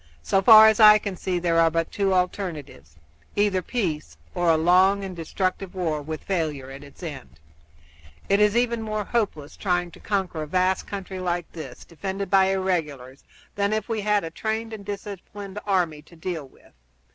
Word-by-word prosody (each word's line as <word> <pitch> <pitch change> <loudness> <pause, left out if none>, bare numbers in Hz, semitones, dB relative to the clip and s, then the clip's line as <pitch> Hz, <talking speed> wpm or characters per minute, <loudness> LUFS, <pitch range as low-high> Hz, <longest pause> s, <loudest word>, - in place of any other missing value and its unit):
"So 195 - +2
far 220 +1 +9
as 220 0 +3
I 215 -1 +9
can 200 -2 -5
see 180 0 -2
there 170 -1 +1
are 165 0 +5
but 165 0 -2
two 200 -1 0
alternatives 170 - -3 0.4
either 205 -2 +2
peace 160 - -3 0.2
or 175 -1 +1
a 160 - +5
long 185 +4 +4
and 190 -2 -6
destructive 185 +3 -3
war 160 -5 -1
with 155 +1 -6
failure 155 -8 -2
at 135 +1 -10
its 145 +5 -15
end. 75 - -8 0.9
It 200 - +3
is 210 +2 +3
even 235 -1 +1
more 215 -1 -3
hopeless 200 -10 -2
trying 175 -3 -1
to - - -15
conquer 190 -6 -2
a 155 - -5
vast 185 +3 0
country 195 -2 -6
like 175 -2 -3
this, 140 -7 -9
defended 190 +3 -5
by 195 -1 +5
irregulars, 160 -9 -2 0.3
than 200 +1 0
if 215 - -2
we 225 -2 -2
had 210 -1 +1
a 165 - -5
trained 220 +4 -3
and 210 -2 -7
disciplined 200 0 -7
army 175 -6 0
to 160 +3 -19
deal 160 -3 -5
with. - - -23
185 Hz, 180 wpm, -24 LUFS, 160-200 Hz, 0.9 s, far